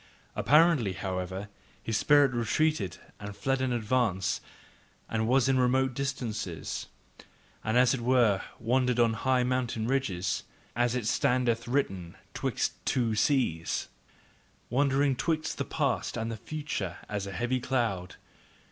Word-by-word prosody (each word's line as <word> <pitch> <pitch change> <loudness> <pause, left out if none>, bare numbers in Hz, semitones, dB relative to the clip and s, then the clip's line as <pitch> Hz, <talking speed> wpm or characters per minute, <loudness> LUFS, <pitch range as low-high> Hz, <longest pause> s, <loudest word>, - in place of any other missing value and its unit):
Apparently, 145 - +4
however, 95 +2 -4 0.4
his 110 - -2
spirit 145 +1 +4
retreated 120 - 0 0.2
and 100 0 -7
fled 135 -1 0
in 130 -1 0
advance 110 -5 0 0.7
and 110 0 -1
was 130 +1 +3
in 135 -1 +3
remote 130 +1 +2
distances, 115 - -4 0.8
and 110 +2 +1
as 125 0 +5
it 130 - -2
were 120 -5 +3 0.2
"wandering 125 +1 +1
on 115 -1 +4
high 130 +3 +1
mountain 125 -3 -1
ridges," 95 -9 -1 0.3
as 120 +1 +1
it 125 -4 -2
standeth 120 +1 +1
written, 95 -10 -1 0.2
"'twixt - - -2
two 120 -4 +1
seas, 110 - 0 0.8
Wandering 140 +1 +2
'twixt 155 +3 -1
the - - -1
past - - -1
and 115 +1 -2
the 115 - -5
future 120 - -4
as 100 -2 -3
a - - -5
heavy 120 +5 -1
cloud." 115 -8 -1
120 Hz, 130 wpm, -29 LUFS, 105-130 Hz, 0.8 s, as